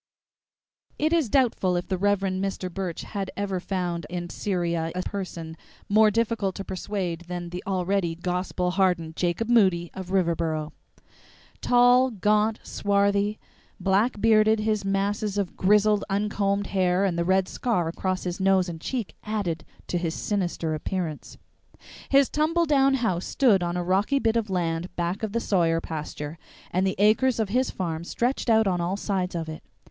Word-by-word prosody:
II - - +1
It 315 - +2
is 320 -9 +2
doubtful 220 -8 +2
if 175 - -2
the 190 - 0
Rev. 205 0 +2
Mr. 190 -1 -2
Burch 185 -3 -4
had 195 -2 -4
ever 195 -2 -1
found 175 -3 -3
in 175 0 -5
Syria 170 -4 -1
a 185 - -2
person 170 -5 -5 0.3
more 215 +1 +5
difficult 215 -3 0
to 195 - -5
persuade 185 -3 -4
than 175 -1 -5
the 180 +1 -5
already 185 -2 0
"gospel 180 +1 -2
hardened" 180 -4 +1
Jacob 175 +6 -1
Moody 190 -8 +3
of 190 -1 -7
Riverboro. 165 -4 0 0.9
Tall, 245 +1 +5
gaunt, 215 0 +1
swarthy, 200 +1 +1 0.4
black 205 +4 +1
bearded 220 0 +4
his 215 -1 0
masses 200 +1 -1
of 200 -3 -2
grizzled, 210 +2 +3
uncombed 200 0 0
hair 185 0 +2
and 185 -3 0
the 170 - 0
red 190 +1 +2
scar 200 -9 -1
across 185 +2 -2
his 180 0 -4
nose 190 -1 +3
and 165 -2 -7
cheek 240 -2 -4
added 195 -7 -2 0.2
to 175 - -1
his 170 -2 -2
sinister 175 -5 -2
appearance. 160 0 -4 0.7
His 275 -1 +5
tumble 330 +3 +1
down 275 -3 +4
house 190 -9 -1
stood 230 -9 +3
on 175 0 -1
a 175 - -1
rocky 195 +10 +2
bit 225 -4 +1
of 225 -3 0
land 175 -1 -2
back 175 +2 -2
of 220 -2 -2
the 235 - 0
Sawyer 170 -7 +2
pasture, 155 -1 -6 0.3
and 185 +2 +1
the 190 - -1
acres 220 +5 +3
of 215 -3 0
his 255 +4 +1
farm 165 -3 -3
stretched 240 +7 -1
out 220 -1 +5
on 180 -3 0
all 180 +3 -1
sides 190 -3 -2
of 165 -1 -3
it. 155 0 -7
190 Hz, 165 wpm, -25 LUFS, 175-215 Hz, 0.9 s, more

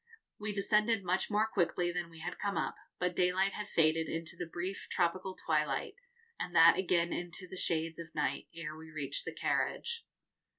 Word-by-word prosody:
We 210 0 -2
descended 210 +1 +2
much 180 +1 +1
more 210 +1 +3
quickly 175 -4 +1
than 175 -1 -3
we 165 -1 -12
had 175 +2 -5
come 200 -1 -1
up, - - 0 0.2
but 180 -1 0
daylight 185 +2 +2
had 210 -1 -4
faded 160 0 +3
into 165 +1 -4
the 170 0 -5
brief 180 +4 -4
tropical 185 +2 0
twilight, 150 -4 0 0.5
and 175 - -4
that 165 0 +9
again 175 -2 +2
into 175 +1 -2
the 185 - -8
shades 165 -2 0
of 165 -1 -9
night, - - -1
ere 165 -2 -5
we 160 0 -11
reached 145 -3 -2
the - - -3
carriage. 470 -1 -1
175 Hz, 180 wpm, -33 LUFS, 165-190 Hz, 0.5 s, that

